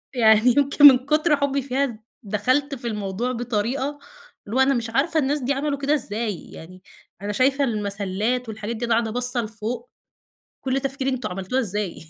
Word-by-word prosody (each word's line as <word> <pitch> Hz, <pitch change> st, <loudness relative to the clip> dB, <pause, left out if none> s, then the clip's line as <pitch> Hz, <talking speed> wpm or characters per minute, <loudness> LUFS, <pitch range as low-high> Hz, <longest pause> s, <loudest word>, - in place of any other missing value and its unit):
يعني 225 Hz, 0 st, +5 dB
يمكن 285 Hz, +1 st, +5 dB
من 260 Hz, -3 st, +8 dB
كُتر 305 Hz, +2 st, +3 dB
حبي 280 Hz, 0 st, 0 dB
فيها 270 Hz, +1 st, 0 dB
ذ 245 Hz, -5 st, -6 dB, 0.3 s
دخلت 255 Hz, +8 st, 0 dB
في 245 Hz, -2 st, -6 dB
الموضوع 210 Hz, +2 st, -2 dB
بطريقة 245 Hz, +4 st, -2 dB, 0.5 s
اللي 215 Hz, +4 st, -6 dB
هو -, -, +2 dB
أنا 265 Hz, +1 st, +4 dB
مش 235 Hz, -3 st, -2 dB
عارفة 305 Hz, +7 st, +1 dB
الناس 290 Hz, +1 st, 0 dB
دي 265 Hz, +2 st, 0 dB
عملوا 280 Hz, +1 st, -2 dB
كده 280 Hz, +2 st, 0 dB
إزاي؟! 220 Hz, -, -3 dB
يعني 185 Hz, +3 st, -12 dB, 0.4 s
أنا 205 Hz, +1 st, -3 dB
شايفة 270 Hz, +5 st, +2 dB
المسَلّات 210 Hz, +1 st, -2 dB
والحاجات 220 Hz, +1 st, -5 dB
دي 235 Hz, +2 st, -3 dB
وأنا 235 Hz, -, +1 dB
قاعدة 225 Hz, -1 st, 0 dB
باصة 245 Hz, +1 st, 0 dB
لفوق. 230 Hz, +2 st, -5 dB, 0.7 s
كل 265 Hz, 0 st, 0 dB
تفكيري 270 Hz, 0 st, -2 dB
أنتم 255 Hz, -1 st, -3 dB
عملتوها 190 Hz, +7 st, -2 dB
إزاي؟! 205 Hz, -4 st, -2 dB
245 Hz, 180 wpm, -23 LUFS, 215-275 Hz, 0.7 s, من